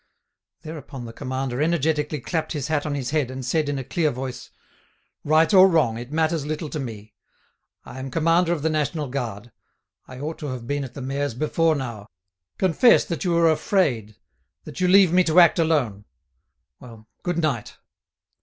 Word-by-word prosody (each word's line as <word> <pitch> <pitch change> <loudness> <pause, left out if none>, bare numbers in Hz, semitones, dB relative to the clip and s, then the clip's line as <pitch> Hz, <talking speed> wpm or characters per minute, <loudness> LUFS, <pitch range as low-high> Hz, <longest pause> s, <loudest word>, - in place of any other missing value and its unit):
Thereupon 145 -5 -8
the 115 - -9
commander 130 0 -3
energetically 155 -2 0
clapped 160 +3 -3
his 145 -1 -4
hat 155 -1 0
on 145 - -2
his 130 -2 -3
head, 150 -5 0
and 130 0 -6
said 155 +2 0
in 145 - -2
a 135 - -4
clear 155 +4 0
voice: 130 -2 -6 0.7
"Right 160 +5 +3
or 190 0 +8
wrong, 130 -10 +2
it 120 +3 -9
matters 160 0 0
little 155 +1 -4
to 155 - -3
me. 110 -5 -7 0.7
I 130 - -9
am 135 +1 -5
commander 165 +4 +2
of 160 -4 -2
the 160 - +2
National 155 0 -1
Guard. 120 -4 -5 0.6
I 130 - -10
ought 155 +3 -5
to 150 - -5
have 130 -3 -6
been 145 +3 -2
at 130 - -9
the 135 - -6
mayor's 140 -1 -2
before 160 +4 +1
now. 115 -7 -6 0.5
Confess 190 +7 +4
that 170 -5 -4
you 175 -2 +1
are 165 -1 +5
afraid, 145 - 0 0.5
that - - -9
you 180 - +3
leave 185 -2 +6
me 185 0 +5
to 165 +1 +4
act 170 0 +6
alone.... 135 -11 0 0.7
Well, 115 -3 -14
good 175 -2 -2
night." 150 -9 -2
150 Hz, 180 wpm, -23 LUFS, 130-165 Hz, 0.7 s, or